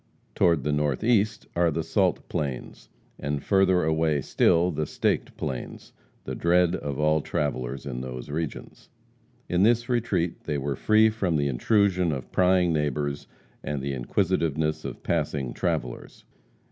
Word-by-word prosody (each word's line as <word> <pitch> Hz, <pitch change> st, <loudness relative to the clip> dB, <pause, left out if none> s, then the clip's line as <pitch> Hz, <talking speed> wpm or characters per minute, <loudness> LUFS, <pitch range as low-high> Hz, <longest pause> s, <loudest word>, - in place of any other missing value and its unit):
Toward 85 Hz, -6 st, +3 dB
the 75 Hz, -, 0 dB
northeast 105 Hz, -, +1 dB
are 85 Hz, 0 st, +3 dB
the 80 Hz, +1 st, -2 dB
Salt 90 Hz, +3 st, 0 dB
Plains, 70 Hz, -4 st, -5 dB, 0.3 s
and, 70 Hz, -1 st, -3 dB
further 95 Hz, -2 st, +3 dB
away 80 Hz, -2 st, +1 dB
still, 85 Hz, +6 st, +3 dB
the 75 Hz, -1 st, -2 dB
Staked -, -, -1 dB
Plains, 65 Hz, -2 st, -6 dB, 0.3 s
the -, -, -5 dB
dread 90 Hz, 0 st, +2 dB
of 70 Hz, -2 st, -4 dB
all 75 Hz, 0 st, +3 dB
travellers 65 Hz, -3 st, -3 dB
in 65 Hz, -3 st, -4 dB
those 65 Hz, +1 st, -7 dB
regions. 80 Hz, -1 st, -5 dB, 0.6 s
In 90 Hz, +1 st, +1 dB
this 120 Hz, +3 st, +3 dB
retreat 100 Hz, -9 st, -1 dB
they 75 Hz, -2 st, -1 dB
were 70 Hz, 0 st, -2 dB
free 110 Hz, +7 st, +4 dB
from 95 Hz, -6 st, -1 dB
the 70 Hz, -1 st, +1 dB
intrusion 90 Hz, -, +2 dB
of 65 Hz, -4 st, -5 dB
prying 90 Hz, -2 st, +3 dB
neighbors, 75 Hz, -1 st, -2 dB, 0.4 s
and 75 Hz, -1 st, -3 dB
the 70 Hz, +1 st, -3 dB
inquisitiveness 80 Hz, +2 st, 0 dB
of -, -, -7 dB
passing 65 Hz, -5 st, -1 dB
travellers. -, -, -3 dB
80 Hz, 145 wpm, -26 LUFS, 70-90 Hz, 0.6 s, free